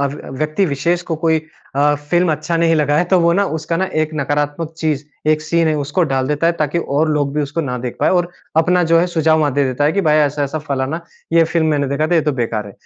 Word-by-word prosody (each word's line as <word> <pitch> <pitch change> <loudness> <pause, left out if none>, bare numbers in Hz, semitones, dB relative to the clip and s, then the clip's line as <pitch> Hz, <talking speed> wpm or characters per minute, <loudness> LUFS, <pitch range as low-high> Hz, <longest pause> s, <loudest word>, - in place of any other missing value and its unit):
किसी 140 -1 -4
व्यक्ति 155 +6 0
विशेष 170 +4 0
को 165 - -1
कोई 160 -1 +3 0.4
अ, 145 +1 +3 0.2
फ़िल्म 175 -2 +3
अच्छा 155 +3 -2
नहीं 165 0 +3
लगा 150 -1 +2
है 175 - +3
तो 185 +1 +3
वो 170 0 +3
ना 200 +3 +2
उसका 160 +1 -2
ना 190 - +1 0.2
एक 155 - -3
नकारात्मक 145 +2 -2
चीज़, 150 -3 -1 0.2
एक 155 0 +3
सीन 165 0 +1
है 155 - +1
उसको 145 +5 -1
डाल 130 -1 0
देता 150 +3 0
है 170 - +3
ताकि 150 +2 0
और 155 0 0
लोग 145 -2 0
भी 150 - +1
उसको 150 +4 -3
ना 125 -5 -3
देख 120 0 -5
पाए - - +3
और 175 - -1 0.3
अपना 180 +2 +3
जो 165 - +6
है 175 - +3
सुझाव 160 -2 +2
वहाँ 145 -2 +1
दे 140 +1 +1
देता 130 +2 -1
है 150 - +3
कि 200 - +1
भाई 155 -4 +3
ऐसा-ऐसा 145 +1 0
फलाना 140 +1 -3 0.3
ये 165 -1 +5
फ़िल्म 165 0 0
मैंने 145 -2 +1
देखा 140 +3 0
था 175 - 0
ये 165 - +4
तो 150 -1 0
बेकार 115 -4 -2
है। 100 - -10
155 Hz, 260 wpm, -18 LUFS, 145-165 Hz, 0.4 s, जो